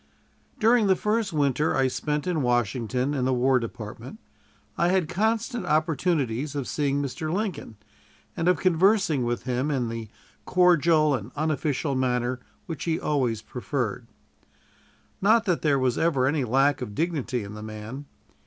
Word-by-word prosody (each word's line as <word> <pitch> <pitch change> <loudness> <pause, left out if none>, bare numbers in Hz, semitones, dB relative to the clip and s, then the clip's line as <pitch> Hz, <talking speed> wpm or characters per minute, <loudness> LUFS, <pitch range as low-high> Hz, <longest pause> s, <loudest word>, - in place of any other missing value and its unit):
During 225 -1 +4
the 190 - +4
first 215 +1 0
winter 150 0 +1
I 135 -1 +3
spent 150 +3 -2
in 175 -4 0
Washington 125 +2 0
in 130 -3 -1
the 130 - +2
War 130 +1 +3
Department 115 - -8 0.6
I 170 - +2
had 180 -2 +2
constant 220 +6 -1
opportunities 150 -4 0
of 140 -3 -3
seeing 145 -1 0
Mr. 140 +4 -4
Lincoln, 180 - -3 0.6
and 165 - -1
of 180 - +4
conversing 185 - +3
with 120 0 -2
him 130 +3 -1
in 130 -5 -1
the 115 -2 -6 0.3
cordial 165 -4 +4
and 120 -2 -4
unofficial 150 -1 -1
manner 125 -1 0 0.3
which 165 -4 -6
he 165 -1 0
always 125 -7 -1
preferred. 125 -1 -3 1.1
Not 220 +3 +4
that 180 -5 0
there 145 -3 +2
was 130 -2 0
ever 145 -6 +2
any 140 0 +1
lack 135 +4 +2
of 105 - -6
dignity 145 -7 -1
in 100 +1 -8
the 105 - -8
man. 110 +6 -7
145 Hz, 155 wpm, -26 LUFS, 125-170 Hz, 1.1 s, During